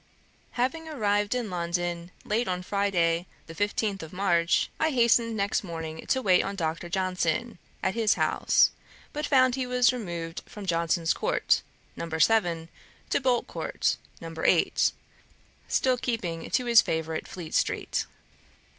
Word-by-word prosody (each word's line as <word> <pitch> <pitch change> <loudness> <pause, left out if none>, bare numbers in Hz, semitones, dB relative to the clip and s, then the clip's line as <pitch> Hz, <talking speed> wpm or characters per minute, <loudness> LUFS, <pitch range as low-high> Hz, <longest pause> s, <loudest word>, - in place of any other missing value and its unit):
Having 320 +7 -1
arrived 205 -5 0
in 235 -5 -2
London 175 0 -2 0.2
late 230 +3 0
on 180 -1 -2
Friday, 180 -4 +1 0.2
the 165 - -10
15th 205 +2 -1
of 160 - -8
March, 175 -3 +2
I 315 - +3
hastened 235 -4 +3
next 200 +1 0
morning 165 -3 -6
to 260 -1 +1
wait 185 -2 +5
on 200 - -4
Dr. 165 -1 -3
Johnson, 190 +4 -1 0.2
at 190 - +1
his 225 -2 +2
house; - - +3 0.4
but 300 0 -2
found 255 -3 +4
he 255 -1 -2
was 250 0 +3
removed 170 -8 -5
from 205 -2 -9
Johnson's 170 -1 +1
court, - - +1 0.3
No. 170 - -5
7, 165 -1 +2 0.4
to - - +2
Boltcourt, 250 -2 0 0.2
No. 165 0 -8
8, - - +3 0.8
still 255 -1 +2
keeping 185 -10 -3
to 250 - +1
his 235 -1 +7
favourite 160 0 -3
Fleet 170 -4 -8
street. - - 0
195 Hz, 140 wpm, -27 LUFS, 170-235 Hz, 0.8 s, his